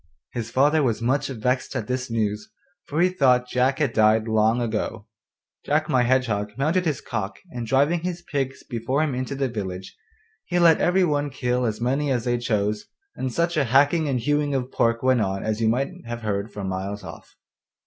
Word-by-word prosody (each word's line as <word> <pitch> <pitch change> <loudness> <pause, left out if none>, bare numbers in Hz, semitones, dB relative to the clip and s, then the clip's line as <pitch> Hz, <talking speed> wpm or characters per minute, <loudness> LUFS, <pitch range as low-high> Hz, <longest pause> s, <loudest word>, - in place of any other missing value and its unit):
His 115 -2 -4
father 145 +6 +3
was 120 -6 +1
much 135 +4 0
vexed 130 +1 -2
at 120 -5 -2
this 125 +2 -3
news, 105 -2 -2 0.4
for 155 +3 0
he 180 - +5
thought 130 -8 +3
Jack 130 +2 +1
had 145 -6 0
died 110 0 +3
long 110 +2 +2
ago. 110 -2 -3 0.6
Jack 155 +2 +1
my 130 -4 +3
Hedgehog 120 -5 +1
mounted 160 +7 +1
his 150 -5 -1
cock, 105 -3 -4
and 120 -4 -5
driving 145 +8 +3
his 175 0 -4
pigs 135 -5 -3
before 125 +5 -1
him 150 -4 -1
into 130 +2 -3
the 135 0 0
village, 95 -5 -6 0.5
he 175 - -1
let 170 -2 +5
every 185 +2 +3
one 145 -3 +1
kill 125 -2 -1
as 105 -1 -3
many 135 +5 0
as 120 -3 0
they 120 0 0
chose, 105 -3 -1 0.3
and 130 - -3
such 170 +6 0
a 150 -3 +2
hacking 145 +5 +3
and 125 -3 0
hewing 145 +2 +1
of 130 -1 -2
pork 115 +1 +1
went 130 -2 +3
on 95 -1 -1
as 110 +1 -2
you 110 - +3
might 130 +4 +1 0.2
have 120 -1 -5
heard 100 0 -2
for 100 - -6
miles 95 +2 -4
off. - - -11
125 Hz, 200 wpm, -24 LUFS, 110-145 Hz, 0.6 s, he